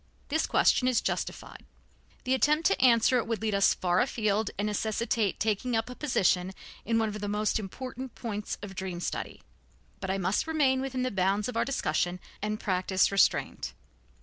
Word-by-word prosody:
This 315 +2 +1
question 250 - +3
is 255 -2 +3
justified. - - -4 0.6
The 255 - +1
attempt 300 +5 +2
to 395 - +3
answer 245 0 +5
it 230 - -3
would 230 -1 -1
lead 215 -1 -1
us 200 0 +4
far 180 0 +1
afield 215 -4 0
and 205 - -1
necessitate 215 0 -1
taking 220 +3 0
up 225 +2 -1
a - - -8
position 190 -10 +1 0.3
in 230 +1 +1
one 225 -1 +2
of 210 0 -6
the 205 - -3
most 210 +2 0
important 255 +5 -7
points 210 -3 -4
of 200 -2 -7
dream 185 -2 -5
study. - - -4 0.6
But - - -5
I 190 - 0
must 190 - 0
remain 275 -5 +2
within 260 -1 -2
the 255 - -1
bounds 195 +1 +1
of 250 - -5
our 230 - +1
discussion 180 - -1 0.2
and 215 +1 -2
practice 185 0 +1
restraint. 200 -1 +1
215 Hz, 180 wpm, -29 LUFS, 195-250 Hz, 0.6 s, answer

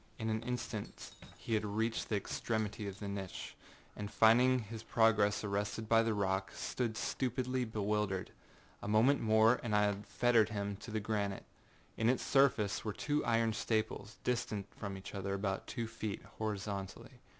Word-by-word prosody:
In 110 0 -2
an 110 0 -1
instant 120 -3 -5 0.3
he 115 - -4
had 110 - +2
reached 110 +2 -1
the 110 - +1
extremity 105 0 -2
of 100 -1 -6
the 105 - -6
niche, 100 -2 -5 0.4
and 105 -1 -5
finding 115 +5 +5
his 110 +1 -7
progress 110 -2 +3
arrested 105 +2 -2
by 115 +1 +5
the 115 -1 +1
rock, 95 -1 0
stood 115 -4 -2
stupidly 130 +1 -1
bewildered. 105 -3 -1 0.5
A - - -5
moment 115 +7 +4
more 110 +2 +5
and 110 -3 -1
I 105 - +5
had 105 0 -1
fettered 115 -1 +3
him 100 -1 -2
to 110 - -10
the 110 0 -1
granite. 100 -2 -2 0.5
In 110 +1 +3
its 130 - +1
surface 125 -7 +3
were 105 - -2
two 145 +7 0
iron 115 -1 +2
staples, 110 0 -2
distant 110 -5 -1
from 100 -2 -5
each 95 - -9
other 100 0 -2
about 95 -1 -2
two 115 - -3
feet, 110 -2 -5 0.2
horizontally. 100 -2 -4
110 Hz, 165 wpm, -35 LUFS, 100-115 Hz, 0.5 s, finding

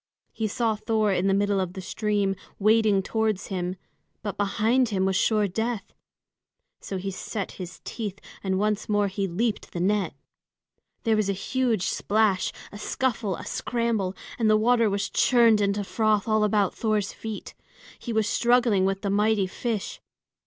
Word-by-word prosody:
He 220 - -2
saw 225 +1 0
Thor 215 -1 +1
in 185 +1 +1
the 195 - +3
middle 200 0 +2
of 185 -1 -2
the 190 - -7
stream 205 0 0 0.2
wading 215 -1 +3
towards 220 -2 -1
him; 180 0 -2 0.5
but 205 -2 -3
behind 220 +5 +2
him 190 -3 0
was 190 0 +1
sure 210 0 +2
death. 220 +1 -3 0.9
So 195 - -5
he 195 +1 -3
set 200 +1 -4
his 180 0 -8
teeth 205 -4 -5 0.3
and 190 -1 0
once 210 +1 0
more 205 -1 +2
he 195 0 -2
leaped 210 +5 -1
the 175 - -3
net. 200 +2 +1 0.9
There 225 -2 +3
was 215 -2 +1
a - - +2
huge 230 0 0
splash, 210 -3 +1 0.2
a 205 - -9
scuffle, 220 -6 -1
a - - -9
scramble, 230 -6 -1 0.2
and 225 -2 +3
the 215 - +5
water 230 0 +3
was 200 0 -1
churned 230 -4 +4
into 200 0 +1
froth 215 0 +1
all 215 -1 +3
about 205 -2 +2
Thor's 215 -3 -1
feet. 220 -2 -7 0.5
He 240 - -5
was 220 -2 +1
struggling 235 -5 +3
with 195 +2 -1
the 200 - 0
mighty 210 0 +2
fish. 215 +2 -4
210 Hz, 165 wpm, -26 LUFS, 195-220 Hz, 0.9 s, the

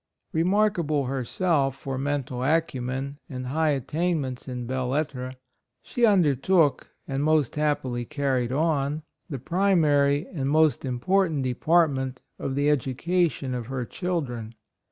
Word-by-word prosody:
Remarkable 170 -5 +2
herself 135 +2 0
for 135 0 -4
mental 135 -2 -2
acumen 135 -2 -1
and 130 -2 -5
high 155 +5 +1
attain 155 +5 0
ments 130 -2 -5
in 125 -2 -4
belles 130 0 -2
lettres, 130 -3 -2 0.5
she 240 -1 +2
under 180 -9 +4
took, 155 +2 +2 0.2
and 135 +1 -1
most 155 -4 +2
happily 145 -5 0
carried 130 -2 -1
on 150 0 0 0.3
the 140 - -3
primary 150 -2 +2
and 135 -5 -1
most 155 0 +3
important 155 +4 +1
department 135 -1 +1 0.2
of 135 - -3
the 145 +1 +1
education 150 +1 0
of 120 -3 -4
her 130 -2 -3
children. 125 - -3
140 Hz, 130 wpm, -26 LUFS, 130-160 Hz, 0.5 s, under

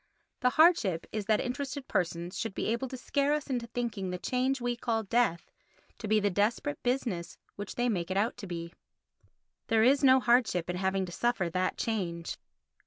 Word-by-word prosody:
The 250 - +3
hardship 250 - +4
is 210 -2 -3
that 215 +1 +3
interested 270 +2 -4
persons 175 +1 -1
should 210 0 -3
be - - -2
able 235 +4 -1
to 260 - -7
scare 280 +3 +1
us 300 -2 -2
into 240 -2 -2
thinking 225 -5 -3
the 180 - -3
change 260 +6 0
we 245 0 -1
call 230 -2 -1
death 205 -5 0 0.5
to 220 - -5
be 215 +1 +4
the 205 -1 +1
desperate 230 - 0
business 245 -9 -2 0.2
which 205 0 -6
they 245 0 +1
make 180 -7 -1
it 190 - -1
out 215 +4 +1
to 200 - -7
be. 170 -1 -6 0.9
There 225 -1 +3
is 275 +4 +4
no 260 -1 +7
hardship 235 -9 +2
in 180 - -4
having 190 0 0
to 175 - -9
suffer 190 -4 0
that 185 +2 0
change. 175 -7 -3
225 Hz, 190 wpm, -30 LUFS, 185-250 Hz, 0.9 s, no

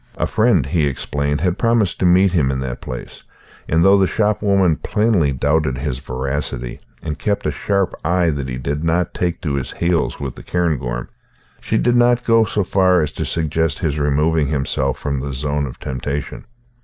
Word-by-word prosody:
A - - 0
friend, 110 - +2
he 75 +1 +1
explained, 70 +1 -2
had 90 +1 0
promised 115 -6 +1
to 90 - +3
meet 90 +2 +5
him 75 -7 +2
in 65 0 -1
that 65 -2 -5
place; 60 -1 -8 0.5
and 80 +3 +3
though 100 +1 +6
the 95 - +3
shopwoman 100 -5 +2
plainly 105 -9 +1
doubted 70 +1 +1
his 65 -1 -3
veracity, 65 -2 -4 0.2
and 75 -2 -4
kept 100 -1 -1
a - - +1
sharp 100 -2 0
eye 85 0 +2
that 70 -3 -4
he 65 - -4
did 70 +4 -3
not 85 +1 0
take 90 -1 -2
to 75 -4 -2
his 70 -2 -3
heels 85 -1 0
with 70 -3 -4
the - - -11
cairngorm, 70 -9 -2 0.5
she - - -1
did 120 0 +2
not 120 0 +4
go 115 -1 +4
so 105 0 -1
far 90 -1 +3
as 75 - -3
to - - -4
suggest 80 -2 0
his 75 -1 -1
removing 75 +1 +2
himself 70 -2 -1
from 70 -2 -2
the 70 +1 -4
zone 70 +1 -1
of 65 - -10
temptation. 70 +2 -4
75 Hz, 190 wpm, -19 LUFS, 70-90 Hz, 0.5 s, though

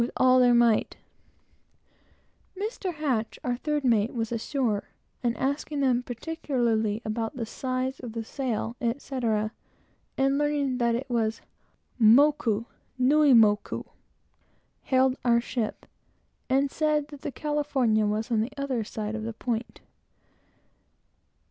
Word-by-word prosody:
with 235 - +1
all 255 0 +5
their 245 -1 +5
might. 235 -2 +3 1.6
Mr. 345 - -1
H., 225 - -12
our 245 -1 0
third 295 +3 -2
mate, 230 -2 +2
was 225 -1 -2
ashore, 230 -2 -1 0.3
and 240 -1 0
asking 285 +2 -2
them 255 -3 +2
particularly 240 -5 -1
about 225 +3 -3
the 235 -3 -3
size 255 +3 -3
of 240 -3 -7
the 230 -1 -3
sail, 235 -1 -3
etc., 230 -3 -1 0.7
and 275 +1 +2
learning 290 -3 0
that 235 -1 +2
it 260 +3 -4
was 225 -3 -1 0.6
"Moku 230 -2 +5 0.3
Nui 285 +2 +5
Moku," 215 -3 +3 1.0
hailed 260 0 +2
our 235 -1 +4
ship, 235 -2 -3 0.6
and 270 +1 +2
said 300 -2 0
that 290 -2 -11
the 295 - -4
California 270 -8 +1
was 215 +3 -2
on 220 -2 +2
the 230 +5 -3
other 270 -5 -1
side 215 0 -5
of 220 - -3
the 225 +1 -4
point. 230 0 -4
245 Hz, 130 wpm, -27 LUFS, 225-275 Hz, 1.6 s, all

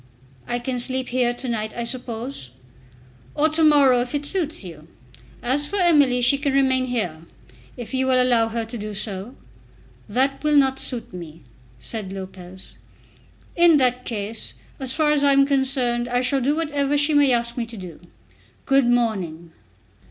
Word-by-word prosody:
"I 240 - -1
can 245 +1 -3
sleep 260 +1 0
here 245 -1 +2
to 245 +2 -7
night, 215 -2 -3
I 235 - -2
suppose?" 235 - -5 0.9
"Or 310 +2 +2
to 320 +1 +1
morrow 280 -5 +5
if 245 +4 -4
it 290 0 -2
suits 320 - -1
you. 165 -4 -11 0.6
As 275 +4 +1
for 405 - -6
Emily, 290 -9 +4
she 275 +3 +4
can 285 -2 -1
remain 260 -1 +3
here, 185 -11 -2 0.6
if 240 +1 -8
you 260 0 +1
will 255 -1 +3
allow 240 -3 +3
her 225 0 -3
to 230 +2 -7
do 210 0 -6
so." 200 +4 -3 0.7
"That 265 +7 +1
will 300 0 +2
not 265 -2 +3
suit 245 -7 -3
me," 165 -3 -10 0.4
said 200 - -5
Lopez. 190 -1 -10 0.8
"In 340 -2 +5
that 250 -2 +1
case, 220 -1 -3 0.2
as 265 -2 -2
far 305 +2 +1
as 295 -1 +2
I 280 -1 +5
am 275 0 +5
concerned, 265 -3 0
I 245 0 0
shall 270 +1 0
do 280 +4 +1
whatever 290 -3 0
she 290 +2 +1
may 290 -2 +4
ask 235 -1 0
me 235 -2 -3
to 230 -1 -9
do. 180 -5 -10 0.7
Good 270 -2 +3
morning." 190 -9 -1
250 Hz, 175 wpm, -22 LUFS, 225-275 Hz, 0.9 s, morrow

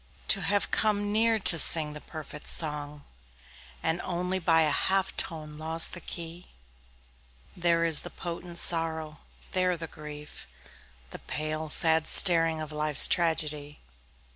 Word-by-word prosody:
To - - +3
have 205 0 0
come 205 -1 0
near 225 +1 +2
to 180 -5 +5
sing 155 -2 +4
the 150 - -9
perfect 150 -2 -10
song 150 -2 -4 0.8
And 165 +2 -1
only 180 +1 -2
by 165 -2 +3
a 150 - +1
half 190 +5 0
tone 155 -2 -5
lost 160 +1 +3
the 175 - -8
key, 170 +1 -8 1.1
There 170 -1 +1
is 160 -3 +4
the - - -7
potent 175 0 -7
sorrow, 160 -3 -1 0.3
there 185 -1 +1
the 165 - -5
grief, 150 -1 -11 0.6
The - - -9
pale, 155 +1 -4
sad 160 +1 +2
staring 165 -3 +3
of 155 0 -7
life's 150 -1 +5
tragedy. 150 -3 -1
165 Hz, 140 wpm, -28 LUFS, 155-175 Hz, 1.1 s, to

